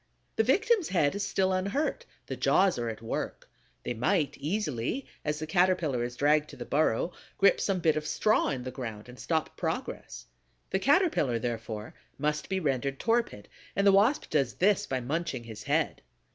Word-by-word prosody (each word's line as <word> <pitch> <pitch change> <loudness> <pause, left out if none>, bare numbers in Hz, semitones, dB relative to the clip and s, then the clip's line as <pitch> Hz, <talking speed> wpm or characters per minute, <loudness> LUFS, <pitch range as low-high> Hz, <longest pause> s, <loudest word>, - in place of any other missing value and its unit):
The 220 - +3
victim's 405 - +2
head 155 -6 +2
is 200 - -3
still 190 -1 +1
unhurt, 270 - -1 0.2
the - - -4
jaws 185 -8 +3
are 120 -1 -1
at 110 0 -7
work; 115 - -4 0.4
they - - -2
might 140 - +1
easily, 155 - -2 0.2
as 150 0 -1
the 155 - -4
Caterpillar 175 -7 +2
is 120 0 -4
dragged 150 +2 +2
to - - -10
the - - -7
burrow, 155 +2 +1 0.3
grip 195 -1 +4
some 195 -2 0
bit 160 -2 +3
of 155 0 -2
straw 215 0 +2
in 130 -3 -3
the 130 - -5
ground 115 -4 -7
and 125 - -12
stop 160 -2 -1
progress. - - -4 0.5
The 190 - +1
Caterpillar, 275 - +3
therefore, 115 -2 -4 0.2
must 150 +1 -1
be 190 0 0
rendered 135 -3 -1
torpid, 230 - 0 0.3
and 200 - +2
the 200 - +7
Wasp 210 +9 +3
does 135 -5 +1
this 205 +2 +2
by 130 -1 -1
munching 155 0 -2
his 110 -2 -9
head. - - 0
155 Hz, 180 wpm, -29 LUFS, 125-200 Hz, 0.5 s, the